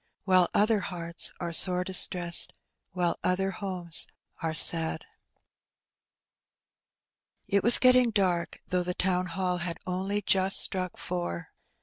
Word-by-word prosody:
While 185 -2 +1
other 215 +1 0
hearts 170 -3 -1
ore 170 -1 -7
sore 180 +2 +1
distreseed, 180 -2 +1 0.4
While 175 -2 -3
other 190 +1 -2
homes 180 -4 -3 0.3
are 160 -1 -5
sad? 165 +1 +7 2.4
T 200 - -1
was 235 - +8
getting 255 -1 +2
dark, 185 -5 -3
thongh 180 0 -3
the 180 0 -4
Town 180 0 -2
Hall 180 +1 -4
clock 170 - -5
had 170 -1 -6
only 190 +3 -5
just 190 0 +1
struck 185 -1 -5
four. 85 -1 -7
180 Hz, 125 wpm, -25 LUFS, 170-195 Hz, 2.4 s, was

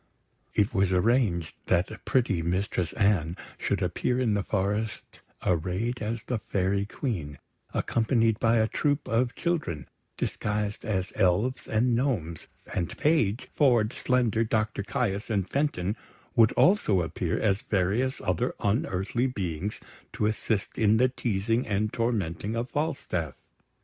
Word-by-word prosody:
It 105 -1 +2
was 95 -1 +2
arranged 95 -4 +2
that 95 +5 0
pretty 115 -9 +2
Mistress 90 +1 -1
Anne 95 -6 +2 0.2
should - - 0
appear 125 0 0
in 120 -4 +2
the 100 - +1
forest 105 +3 -2 0.3
arrayed 95 +8 0
as 110 +1 -3
the 125 -3 -1
Fairy 100 0 0
Queen, 85 - -4 0.3
accompanied 115 -1 +1
by 115 0 +3
a 110 0 +3
troop 145 +4 0
of 120 +1 +1
children 155 - -2 0.3
disguised 105 0 -2
as 95 -4 -1
elves 105 +6 +1
and 120 +2 +2
gnomes; 105 - -1 0.3
and 85 -3 -2
Page, 135 -8 +1
Ford, 120 -6 +3
Slender, 120 -3 +1
Doctor 110 -2 0
Caius, 100 0 -2
and 100 -4 0
Fenton 110 -8 0 0.4
would 115 -3 +6
also 175 - +4
appear 80 - -2
as 100 -2 +1
various 105 +7 0
other 90 -2 0
unearthly 100 +3 0
beings 95 -5 -3 0.3
to 105 - 0
assist 105 -1 -1
in 110 -1 +4
the 130 +2 +4
teasing 115 -1 -1
and 105 +1 0
tormenting 110 -3 -1
of 120 +2 -3
Falstaff. 135 - -2
105 Hz, 135 wpm, -27 LUFS, 95-120 Hz, 0.4 s, would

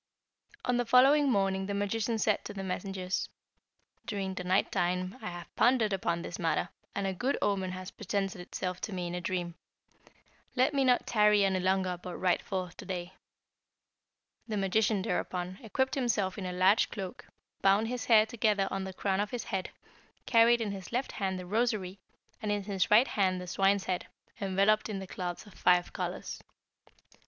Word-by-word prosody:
"On 250 -1 +2
the 245 - +1
following 275 +4 +6
morning 195 -3 +1
the 200 - -2
magician 215 +3 0
said 215 -1 +1
to 205 - -7
the 195 - -4
messengers, 190 0 -3 0.8
'During 195 -3 -2
the 185 - -5
night 185 +2 +2
time 180 +1 0
I - - -4
have 175 0 -9
pondered 235 -4 +3
upon 170 -3 -1
this 175 - -6
matter, 170 0 0 0.3
and 200 - -1
a 190 - 0
good 255 +9 -1
omen 190 -2 0
has 185 +2 -7
presented 200 -1 -3
itself 180 0 -4
to 210 - -4
me 180 -1 -3
in 175 - -4
a 180 - -3
dream. 175 -1 -2 1.0
Let 255 +3 +3
me 275 -1 +2
not 250 -1 +3
tarry 210 -2 +4
any 190 -1 +1
longer 185 -1 0
but 180 -1 -6
ride 180 -1 +2
forth 185 -3 -4
to - - -9
day.' 180 -1 -5 1.3
The 215 -2 -2
magician, 200 +1 +1
thereupon, 180 0 -2
equipped 260 +4 -1
himself 225 -8 0
in 195 -3 -4
a - - -3
large 185 +4 +4
cloak, 190 -4 -7 0.3
bound 200 +3 +4
his 250 0 -3
hair 220 -2 +6
together 215 -4 +1
on 195 0 -2
the 190 - -6
crown 190 0 -1
of 205 0 0
his 245 +1 -4
head, 190 -1 -3 0.6
carried 235 0 +5
in 215 -3 -1
his 190 -2 -7
left 250 +3 -1
hand 190 -2 -2
the 180 - -6
rosary, 205 -2 -1 0.4
and 210 -2 -1
in 205 -1 -1
his 195 -2 0
right 225 +6 +6
the 185 -3 0
swine's 195 +2 +2
head, 180 -1 -2 0.3
enveloped 200 +3 +2
in 210 - -3
the 190 - -5
cloths 180 0 -5
of 205 - -15
five 180 0 +3
colours. - - -4
195 Hz, 185 wpm, -30 LUFS, 185-215 Hz, 1.3 s, following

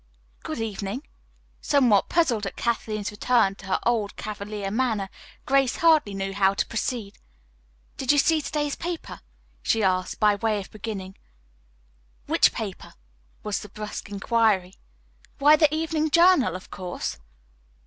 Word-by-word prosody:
"Good 155 - -5
evening." 220 +4 -4 0.5
Somewhat 250 -8 +3
puzzled 240 - +1
at 195 - -6
Kathleen's 215 -3 -2
return 220 -1 +2
to 195 - -12
her 190 - +1
old, 225 -4 0
cavalier 205 -1 -5
manner, 220 -4 -1 0.3
Grace 270 -2 +2
hardly 310 -11 +3
knew 195 0 -3
how 195 0 +2
to - - 0
proceed. 225 -3 -4 0.8
"Did 265 -1 +2
you 290 - +3
see 315 +2 +3
today's 295 -1 -2
paper?" 345 -1 -6 0.4
she 225 -1 +1
asked, 185 -1 0
by 210 -1 +5
way 215 0 0
of 195 - -9
beginning. 195 -3 -6 1.1
"Which - - +4
paper?" - - -7 0.5
was 210 -1 -2
the 210 - -10
brusque 210 0 -7
inquiry. 205 -3 +1 0.6
"Why, 295 +2 +7
the 310 -2 +4
'Evening 315 0 0
Journal,' 335 - +5
of 185 - -9
course." 175 - -5
215 Hz, 140 wpm, -25 LUFS, 200-275 Hz, 1.1 s, Why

